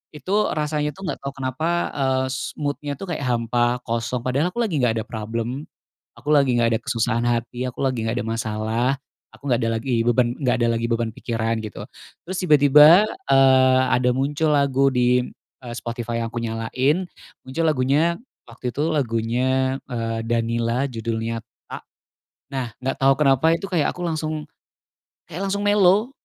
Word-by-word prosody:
Itu 200 +7 0
rasanya, 150 -1 -1
tuh, 190 - -11
nggak 185 - -3
tau 140 0 -6
kenapa, 130 +4 -3 0.2
eee, 130 -1 0
s 130 - -4
mood-nya, 145 0 -3
tuh, 175 +6 -7
kayak 145 -4 -3
hampa, 120 +1 0
kosong, 115 +1 -2
padahal 140 +7 0
aku 240 - +1
lagi 180 -10 -1
nggak 115 -3 +1
ada - - -22
problem, 115 +5 -4 0.5
aku 150 - -4
lagi 140 -4 +4
nggak 115 -1 +3
ada - - -1
kesusahan 115 -1 0
hati, 120 +1 -1
aku 125 - -8
lagi 130 -4 0
nggak 115 - -1
ada - - -6
masalah, 110 +1 -1 0.5
aku 140 -1 -5
nggak 120 - +3
ada - - 0
lagi 120 -1 -1
beban 120 0 +2
nggak 125 -4 +1
ada - - +3
lagi 115 0 -1
beban 115 -1 0
pikiran, 115 0 -2
gitu, 105 - -7 0.4
terus 185 +2 -4
tiba-tiba, 150 +2 +7 0.3
eee, 130 -1 +5
ada 125 0 +3
muncul 145 +4 0
lagu 140 -1 +2
di, 125 0 +3 0.4
eee, 120 -1 -7
Spotify 120 -1 -4
yang 115 - -4
aku 120 - -4
nyalain, 125 +9 0 0.4
muncul 130 +6 -3
lagunya 150 +4 +2 0.3
waktu 125 +1 -5
itu 145 - -2
lagunya, 130 +1 0 0.2
eee, 115 -1 -2
Danilla 115 +3 0
judulnya 115 -1 -3 0.2
Tak, - - -8 0.7
nah, 130 -3 -2
nggak 135 +1 -2
tau 135 0 +6
kenapa, 140 +1 +3
itu 170 - -5
kayak 170 -6 +1
aku 180 - -8
langsung 155 -2 -3 0.8
kayak 175 +4 -5
langsung 200 +1 -1
mellow. 205 +3 +4
130 Hz, 165 wpm, -22 LUFS, 115-145 Hz, 0.8 s, tiba-tiba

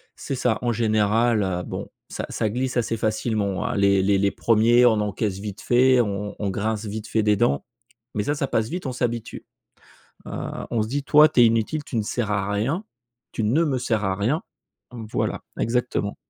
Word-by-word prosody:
c'est - - -5
ça! 125 -3 +1
En 120 - +1
général, 110 0 +2
heu, 90 -2 -1
bon, - - -6 0.2
ça - - -4
ça 110 - -1
glisse 125 +3 -2
assez 115 -1 0
facilement, 110 -3 -1
hein. 120 - -2
Les 100 -1 +3
les 100 +1 +3
les 100 0 +2
1ers, 120 +2 +4
on 110 -2 +3
encaisse 105 -1 -2
vite 105 0 -7
fait, 125 +2 +4
on 105 -1 -3
on - - -16
on 100 -2 -1
grince 110 +2 -2
vite 105 +1 -5
fait 110 - +1
des 105 -1 +3
dents, 70 -7 +1 0.5
mais 105 - 0
ça 145 - 0
ça 140 - -1
passe 110 -2 0
vite, 175 -1 -5
on - - -2
s'habitue, 120 -2 -3 0.8
heu, - - -6 0.4
on 115 - +1
se 110 - -2
dit: 140 +2 -2
«Toi, 150 +1 +6
tu 120 - +3
es - - +8
inutile, 115 +7 +1
tu - - -7
ne 110 - +2
sers 105 0 -2
à 100 0 -1
rien, 135 - -1 0.5
tu 110 - -3
ne 140 +11 +2
me 140 -5 0
sers 110 -3 -1
à 95 -1 0
rien!». 125 - 0 0.5
Mmh, 115 -2 -7
voilà, - - -1 0.2
exactement. 120 -3 -1
110 Hz, 210 wpm, -23 LUFS, 105-120 Hz, 0.8 s, es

